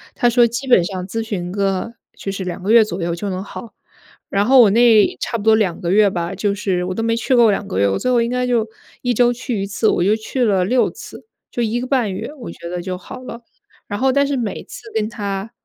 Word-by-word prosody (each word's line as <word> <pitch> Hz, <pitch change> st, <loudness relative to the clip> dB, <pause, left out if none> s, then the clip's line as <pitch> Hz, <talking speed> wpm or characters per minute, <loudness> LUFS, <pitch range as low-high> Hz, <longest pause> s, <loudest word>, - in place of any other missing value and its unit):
他 240 Hz, -, +3 dB
说 240 Hz, 0 st, +4 dB
基 240 Hz, +4 st, -5 dB
本 215 Hz, -9 st, +5 dB
上 185 Hz, -1 st, -5 dB
咨 225 Hz, +3 st, -3 dB
询 185 Hz, -5 st, -4 dB
个 195 Hz, +3 st, -1 dB, 0.2 s
就 195 Hz, -, -4 dB
是 195 Hz, -1 st, -5 dB
2 180 Hz, 0 st, -5 dB
个 205 Hz, -, 0 dB
月 230 Hz, -1 st, +7 dB
左 185 Hz, -3 st, -5 dB
右 170 Hz, 0 st, -1 dB
就 200 Hz, +4 st, -4 dB
能 185 Hz, 0 st, -4 dB
好。 225 Hz, +2 st, -10 dB, 0.6 s
然 200 Hz, +1 st, +1 dB
后 260 Hz, +2 st, +6 dB
我 215 Hz, -, +6 dB
那 225 Hz, -1 st, +4 dB
差 230 Hz, -, -2 dB
不 205 Hz, -, -7 dB
多 220 Hz, 0 st, +5 dB
2 195 Hz, -6 st, 0 dB
个 170 Hz, -, -1 dB
月 205 Hz, +1 st, +5 dB
吧， 175 Hz, 0 st, -3 dB
就 205 Hz, -1 st, 0 dB
是 185 Hz, -3 st, -1 dB
我 185 Hz, -, -3 dB
都 -, -, -2 dB
没 230 Hz, 0 st, +1 dB
去 250 Hz, +3 st, +1 dB
够 235 Hz, -2 st, +6 dB
2 195 Hz, -, -2 dB
个 95 Hz, -, -2 dB
月， 100 Hz, 0 st, +3 dB
我 95 Hz, -, 0 dB
最 255 Hz, -, -1 dB
后 240 Hz, -1 st, +3 dB
应 235 Hz, -, 0 dB
该 250 Hz, 0 st, -1 dB
就 230 Hz, -3 st, +1 dB, 0.3 s
1 245 Hz, -1 st, 0 dB
周 240 Hz, +1 st, +3 dB
去 240 Hz, -4 st, -4 dB
1 -, -, -1 dB
次， 215 Hz, +2 st, 0 dB
我 -, -, +1 dB
就 205 Hz, +4 st, +3 dB
去 235 Hz, +3 st, -2 dB
了 195 Hz, -4 st, +2 dB
6 245 Hz, +5 st, +2 dB
次， -, -, -12 dB, 0.3 s
就 240 Hz, -, -1 dB
1 235 Hz, +2 st, -1 dB
个 255 Hz, -, -4 dB
半 245 Hz, -8 st, 0 dB
月， 185 Hz, -, -5 dB
我 240 Hz, -, -8 dB
觉 170 Hz, 0 st, -9 dB
得 180 Hz, 0 st, -4 dB
就 185 Hz, 0 st, -4 dB
好 255 Hz, -, -10 dB
了。 240 Hz, -2 st, -9 dB, 0.5 s
然 205 Hz, -, -4 dB
后 265 Hz, 0 st, +3 dB
但 280 Hz, +1 st, +3 dB
是 280 Hz, -1 st, -1 dB
每 225 Hz, -5 st, -3 dB
次 -, -, -11 dB
跟 220 Hz, 0 st, -1 dB
他， 200 Hz, -1 st, -4 dB
215 Hz, 260 characters per minute, -19 LUFS, 190-240 Hz, 0.6 s, 月